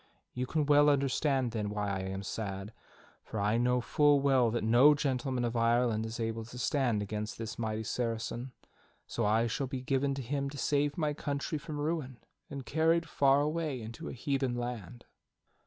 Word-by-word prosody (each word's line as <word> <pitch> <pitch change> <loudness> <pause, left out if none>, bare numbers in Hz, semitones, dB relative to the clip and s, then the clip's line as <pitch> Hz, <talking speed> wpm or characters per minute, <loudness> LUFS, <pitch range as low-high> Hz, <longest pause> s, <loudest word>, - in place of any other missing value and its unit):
You 125 0 -3
can 155 +1 0
well 145 0 +6
understand, 135 -2 +1
then, 105 -3 -2
why 105 -1 -2
I 95 - -2
am 95 +1 -4
sad, 100 0 -5 0.5
for 110 - -5
I 105 +3 +2
know 125 +1 +2
full 145 +3 +4
well 135 -4 +3
that 120 0 -1
no 125 +7 +6
gentleman 130 -3 -1
of 120 0 -2
Ireland 115 -1 +2
is 110 +1 -6
able 115 0 -2
to 120 +2 -10
stand 125 -4 +1
against 105 +1 -4
this 115 0 -6
mighty 110 -1 -2
Saracen, 115 +2 -3 0.5
so - - -1
I 110 +2 +3
shall 125 +4 -2
be 130 -1 -4
given 135 +1 0
to 135 - -4
him 140 +3 -2
to 145 - -9
save 145 0 +1
my 150 -3 0
country 145 +1 -3
from 150 +1 -6
ruin, 145 -4 -2 0.3
and 140 -3 -6
carried 165 +2 +2
far 140 -2 +3
away 150 -2 -1
into 115 0 -7
a - - -6
heathen 135 0 -1
land." 120 -2 -5
125 Hz, 185 wpm, -31 LUFS, 115-140 Hz, 0.5 s, well